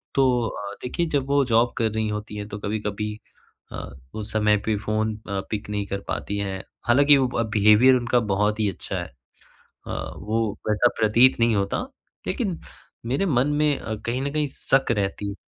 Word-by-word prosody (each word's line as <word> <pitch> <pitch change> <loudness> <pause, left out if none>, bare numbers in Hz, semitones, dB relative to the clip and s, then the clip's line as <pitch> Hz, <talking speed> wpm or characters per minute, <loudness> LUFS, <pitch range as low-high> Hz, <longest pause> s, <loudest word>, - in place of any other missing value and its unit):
तो 125 -4 +3
अ, 100 -1 -6
देखिए 170 +7 -1
जब 140 -3 0
वो 140 0 +3
जॉब 120 0 +3
कर 110 -2 +1
रही 110 0 -1
होती 105 0 -5
है 105 - -5
तो 105 0 -7
कभी-कभी 105 0 -3 0.6
अ, - - -6 0.2
उस 105 -1 -5
समय 105 -1 +3
पे 110 - +1
फ़ोन 110 +1 -1
अ, 100 -1 -1
पिक 105 -1 -4
नहीं 105 -1 -2
कर 100 - -3
पाती 100 - -3
हैं, 95 -1 -3 0.3
हालाँकि 140 +4 +6
वो 125 -3 +1
बिहेवियर 110 +5 +6
उनका 120 0 +2
बहुत 105 +2 +1
ही 105 -2 +2
अच्छा 90 - -6
है। - - -3 0.8
अ, - - -4
वो 110 +2 -1 0.2
वैसा 105 +3 +4
प्रतीत 120 +4 +5
नहीं 115 -2 +3
होता, 100 0 0 0.5
लेकिन 200 - -2 0.5
मेरे 135 +11 0
मन 135 -6 +2
में 150 0 +2
अ, 110 - -4
कहीं 125 +3 -1
न 140 0 -2
कहीं 150 -1 +1
शक 135 -3 +1
रहती 100 0 -2
है। - - -4
110 Hz, 185 wpm, -24 LUFS, 105-130 Hz, 0.8 s, हालाँकि